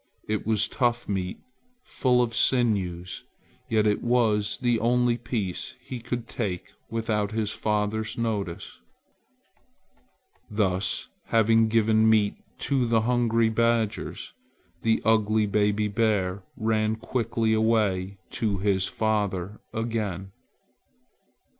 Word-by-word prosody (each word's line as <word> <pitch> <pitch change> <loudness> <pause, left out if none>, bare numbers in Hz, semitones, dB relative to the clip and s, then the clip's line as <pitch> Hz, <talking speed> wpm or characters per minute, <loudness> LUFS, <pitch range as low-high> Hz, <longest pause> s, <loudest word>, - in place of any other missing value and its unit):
It 110 0 -2
was 110 -1 +2
tough 120 -1 0
meat, 95 -2 -3 0.4
full 125 -2 +2
of 115 -1 -3
sinews, 95 -10 +1 0.5
yet 110 -1 +2
it 105 -1 +2
was 110 -4 +2
the 120 -3 +1
only 120 +1 +2
piece 110 -6 -3
he 125 - -7
could 120 0 -4
take 95 -7 -4 0.2
without 110 -2 -1
his 110 -1 0
father's 105 0 -1
notice. 105 -7 -3 1.7
Thus 100 -3 0 0.2
having 115 0 +4
given 110 0 +3
meat 105 -2 +3 0.3
to 130 -3 +1
the 115 -1 +3
hungry 115 -1 +2
badgers, 115 -1 0 0.5
the 115 0 +1
ugly 110 -1 +3
baby 105 +1 +1
bear 100 -3 0 0.2
ran 110 -1 +1
quickly 115 -1 -1
away 105 -4 +1
to 110 -5 -1
his 95 -1 +1
father 105 -2 -1
again. 105 -5 -3
110 Hz, 110 wpm, -26 LUFS, 105-115 Hz, 1.7 s, having